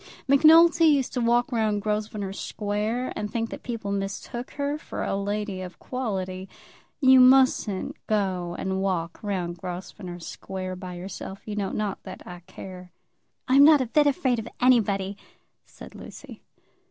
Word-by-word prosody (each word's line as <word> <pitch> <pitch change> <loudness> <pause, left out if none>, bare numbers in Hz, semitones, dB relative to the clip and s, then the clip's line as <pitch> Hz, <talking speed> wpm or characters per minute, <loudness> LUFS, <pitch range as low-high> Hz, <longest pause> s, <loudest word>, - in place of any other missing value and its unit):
Macnulty 325 +4 +6
used 280 -4 +2
to 250 - -1
walk 240 +3 +2
round 215 -3 0
Grosvenor 210 -2 -2
Square 210 +5 -3
and 210 0 -3
think 230 -1 -2
that - - -7
people 230 -4 -4
mistook 200 +5 -4
her 285 0 -2
for - - -6
a - - -1
lady 200 -1 -3
of 180 -1 -8
quality. 190 -7 -4 0.5
You 260 -1 +7
mustn't 255 -6 +4
go 185 -5 -1
and 190 0 -2
walk 175 -4 -2
round 180 -4 -3
Grosvenor 180 0 -7
Square 185 +2 -6
by 180 -1 -7
yourself, 190 +2 -7
you 210 - -4
know. 200 -2 -1
Not 210 -1 -3
that - - -10
I 175 0 -9
care." 185 -1 -10 0.6
"I'm 270 +2 +6
not 300 0 +7
a 260 - 0
bit 295 +5 +3
afraid 260 -3 +1
of 225 - -6
anybody," 205 -6 +2 0.5
said - - -13
Lucy. - - -11
210 Hz, 155 wpm, -25 LUFS, 190-250 Hz, 0.6 s, You